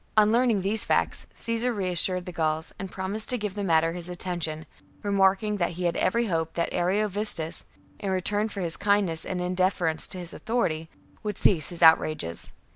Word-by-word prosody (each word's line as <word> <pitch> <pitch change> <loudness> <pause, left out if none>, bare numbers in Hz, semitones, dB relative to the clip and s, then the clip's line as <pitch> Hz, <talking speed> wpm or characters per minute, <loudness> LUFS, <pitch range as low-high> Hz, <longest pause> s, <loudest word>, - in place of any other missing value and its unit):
33. 215 - +7
On 210 - +2
learning 235 -3 +3
these 210 +3 +2
facts, - - +1
Caesar 230 +2 -2
reassured 185 -3 +2
the 180 - -6
Gauls 160 -1 -2
and 195 - -5
promised 200 +3 -2
to 250 - +2
give 210 -3 -4
the 205 0 -4
matter 165 -2 +2
his 175 0 -6
attention, 170 -3 -1 0.4
remarking 200 +1 +2
that 175 -2 -1
he 180 +2 -5
had 170 -1 0
every 235 +6 +1
hope 165 -5 -2
that 170 - -1
Ariovistus, 195 -2 -1 0.3
in 200 - -3
return 205 +3 0
for 200 -2 -6
his 170 -2 -1
kindness 200 -5 +1
and 185 - -3
in 180 +1 -2
deference 180 -3 +2
to - - -5
his 175 -2 -6
authority, 165 -10 -2 0.3
would 210 -2 -4
cease 160 -7 +3
his 175 -1 -3
out 160 0 +9
rages. 85 - -4
185 Hz, 195 wpm, -26 LUFS, 170-205 Hz, 0.4 s, out